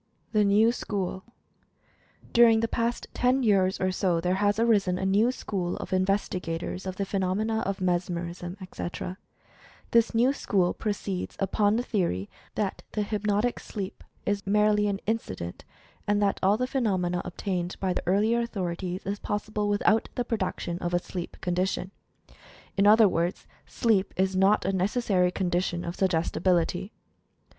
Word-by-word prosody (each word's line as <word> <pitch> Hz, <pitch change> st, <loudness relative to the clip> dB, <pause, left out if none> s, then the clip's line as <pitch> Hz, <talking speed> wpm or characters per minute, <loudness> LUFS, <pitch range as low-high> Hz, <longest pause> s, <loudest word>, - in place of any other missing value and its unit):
THE 215 Hz, -2 st, +3 dB
NEW 210 Hz, +3 st, +5 dB
SCHOOL. 195 Hz, -5 st, -3 dB, 1.1 s
During 230 Hz, -2 st, +6 dB
the 230 Hz, -, +1 dB
past 235 Hz, +1 st, -1 dB
ten 255 Hz, +1 st, +2 dB
years 195 Hz, -4 st, +3 dB
or 185 Hz, 0 st, +1 dB
so 185 Hz, -2 st, +1 dB
there 180 Hz, +2 st, 0 dB
has 205 Hz, 0 st, +3 dB
arisen 205 Hz, -6 st, +3 dB
a 190 Hz, -, -2 dB
new 205 Hz, +5 st, +3 dB
school 185 Hz, -8 st, -3 dB
of -, -, -6 dB
investigators 185 Hz, -2 st, -1 dB
of 185 Hz, -, -3 dB
the 200 Hz, -, -2 dB
phenomena 200 Hz, +4 st, 0 dB
of 195 Hz, -1 st, -3 dB
"Mesmerism," 175 Hz, 0 st, -2 dB
etc. 185 Hz, 0 st, -6 dB, 0.7 s
This 230 Hz, 0 st, +3 dB
new 245 Hz, +4 st, +4 dB
school 185 Hz, -9 st, +1 dB
proceeds 200 Hz, -3 st, -3 dB
upon 205 Hz, +2 st, +2 dB
the 240 Hz, -, 0 dB
theory 170 Hz, -, -1 dB, 0.2 s
that 200 Hz, -3 st, -2 dB
the 210 Hz, -, 0 dB
"hypnotic 210 Hz, +2 st, 0 dB
sleep" 200 Hz, -3 st, -6 dB, 0.2 s
is 200 Hz, -1 st, -1 dB
merely 210 Hz, 0 st, +3 dB
an 200 Hz, -1 st, -2 dB
inci 220 Hz, -, -1 dB
dent, 85 Hz, -1 st, -7 dB, 0.4 s
and 205 Hz, 0 st, +2 dB
that 200 Hz, -1 st, +1 dB
all 200 Hz, +3 st, +4 dB
the 250 Hz, -, 0 dB
phenomena 190 Hz, -9 st, 0 dB
obtained 180 Hz, -1 st, -3 dB
by 190 Hz, -2 st, 0 dB
the -, -, -2 dB
ear 195 Hz, +2 st, +4 dB
lier 230 Hz, +2 st, +2 dB
authorities 185 Hz, -4 st, -3 dB
is 200 Hz, +2 st, -3 dB
possible 210 Hz, 0 st, -2 dB
without 210 Hz, +2 st, +2 dB
the 245 Hz, -, -1 dB
production 185 Hz, -6 st, -2 dB
of 175 Hz, -1 st, -3 dB
the -, -, +4 dB
sleep 175 Hz, 0 st, -6 dB
condition. 185 Hz, +1 st, -1 dB, 0.8 s
In 200 Hz, 0 st, +4 dB
other 220 Hz, +1 st, +7 dB
words, 175 Hz, 0 st, -1 dB, 0.2 s
SLEEP 215 Hz, -5 st, +1 dB
IS 190 Hz, 0 st, +1 dB
NOT 195 Hz, +3 st, +3 dB
A 195 Hz, -, +1 dB
NECESSARY 190 Hz, -1 st, +2 dB
CONDITION 175 Hz, -1 st, -1 dB
OF 170 Hz, +1 st, -4 dB
SUGGESTI 175 Hz, -4 st, 0 dB
BILITY. 180 Hz, +2 st, +1 dB
195 Hz, 155 wpm, -27 LUFS, 180-210 Hz, 1.1 s, other